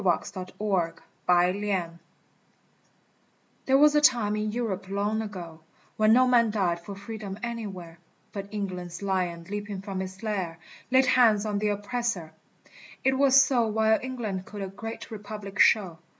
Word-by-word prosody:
QUANTUM 185 0 -1
MUTATA 180 -1 0 1.7
THERE 265 0 +5
was 295 +1 +6
a 295 - +4
time 235 -7 +4
in 215 0 -1
Europe 210 -5 -3
long 205 +2 0
ago 175 -7 -7 0.4
When 215 0 +4
no 255 +2 +6
man 235 -2 +4
died 185 -5 0
for 195 +4 -8
freedom 200 -1 -7
anywhere, 195 -8 -6 0.3
But 200 -1 -6
England's 185 -3 -5
lion 180 -3 -1
leaping 205 -1 -4
from 195 -1 -4
its 190 +2 -7
lair 190 -7 -2 0.3
Laid 260 +1 +5
hands 225 -5 +4
on 205 -1 -1
the 210 - 0
oppressor! 205 -5 -2 0.7
it 265 0 +3
was 275 -1 +6
so 255 -3 +3
While 220 0 +2
England 225 -8 -4
could 205 -1 -6
a - - -3
great 225 +4 -8
Republic 205 -2 -7
show. 185 -6 +4
205 Hz, 145 wpm, -27 LUFS, 185-225 Hz, 1.7 s, was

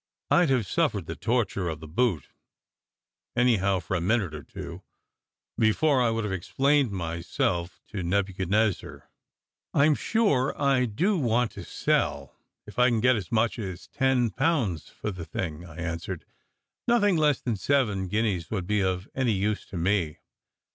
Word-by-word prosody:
I 175 -1 +5
d 135 - +3
have 120 -5 +1
suffered - - 0
the - - -5
torture 105 -5 0
of 80 -1 -5
the 80 - -9
boot 90 - 0 1.1
(anyhow, 100 -6 +3
for 85 +2 -3
a 90 - 0
minute 100 -2 +1
or 75 - -6
two) - - -8 0.8
before 130 +5 +3
I 120 - +3
would 115 0 -1
have 105 -2 -2
explained 135 - +2
myself 85 -1 -2
to 100 -2 -4
Nebuchadnezzar. 95 +2 0 0.7
"I 140 - +5
m 155 - +5
sure 145 - +1
I 135 -3 +3
do 175 - +1
want 120 -3 +1
to - - -8
sell, - - -1 0.3
if 105 +3 -8
I 125 +1 +6
can 115 -2 +1
get 125 +2 +4
as 100 -6 -5
much 115 +1 +1
as 95 -4 -6
ten 130 -4 +2
pounds 130 - 0
for 105 - -5
the 90 -3 -7
thing," 80 0 -5
I 80 - -12
answered. 85 +1 -4 0.6
"Nothing 205 -5 +4
less 150 -4 +3
than 120 -3 -2
seven 105 -3 +1
guineas 100 -4 -1
would 95 -5 -2
be 105 +2 +1
of 95 +1 -1
any 130 -4 +1
use 105 +2 -1
to 95 - -7
me. 85 -3 0
105 Hz, 165 wpm, -27 LUFS, 90-125 Hz, 1.1 s, I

